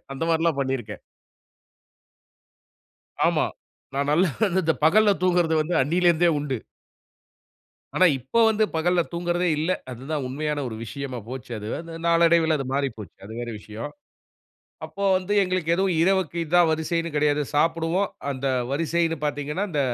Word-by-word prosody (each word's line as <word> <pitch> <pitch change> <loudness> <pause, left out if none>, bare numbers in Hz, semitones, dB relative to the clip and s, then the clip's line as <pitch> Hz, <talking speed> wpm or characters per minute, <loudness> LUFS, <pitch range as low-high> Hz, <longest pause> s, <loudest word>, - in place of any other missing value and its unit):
அந்த 135 - -6
மாரில்லாம் 165 -3 +1
பண்ணிருக்கேன். 130 -6 -3 2.3
ஆமா. - - +2 0.5
நான் 140 +1 -1
நல்லா 170 +3 +3
வந்து 190 -2 +1
அந்த 160 - +3
பகல 205 +5 +5
தூங்குறத 175 -3 +2
வந்து 165 +3 -1
அண்ணியிலருந்தே 170 +3 +3
உண்டு. 145 -3 -2 1.4
ஆனா 185 - +5
இப்ப 130 - -7
வந்து 215 0 +2
பகல 175 +2 +2
தூங்குறதே 175 +1 0
இல்ல! 160 +4 0 0.2
அது 125 +1 -9
தான் 150 -4 -1
உண்மையான 150 +2 -2
ஒரு 110 - -6
விஷயமா 130 +1 -6
போச்சி 130 -2 -7
அது. 105 - -7
அது 165 0 -9
நாளடைவில 165 -1 +4
அது 135 - -4
மாறிப்போச்சி. 115 - -3
அது 110 - -9
வேற 120 - -4
விஷயம். 110 +6 -8 0.9
அப்போ 200 - -7
வந்து 185 +2 -3
எங்களுக்கு 185 -3 -2
எதுவும், 190 -1 +1
இரவுக்கு 190 -2 +1
இதுதான் 175 +1 +4
வரிசைன்னு 165 +1 -1
கிடையாது. 150 0 +2
சாப்பிடுவோம் 165 +5 +1 0.2
அந்த 135 0 -4 0.3
வரிசைன்னு 165 +2 0
பாத்தீங்கன்னா, 150 +5 -2
அந்த 150 -4 -1
160 Hz, 140 wpm, -24 LUFS, 140-175 Hz, 2.3 s, பகல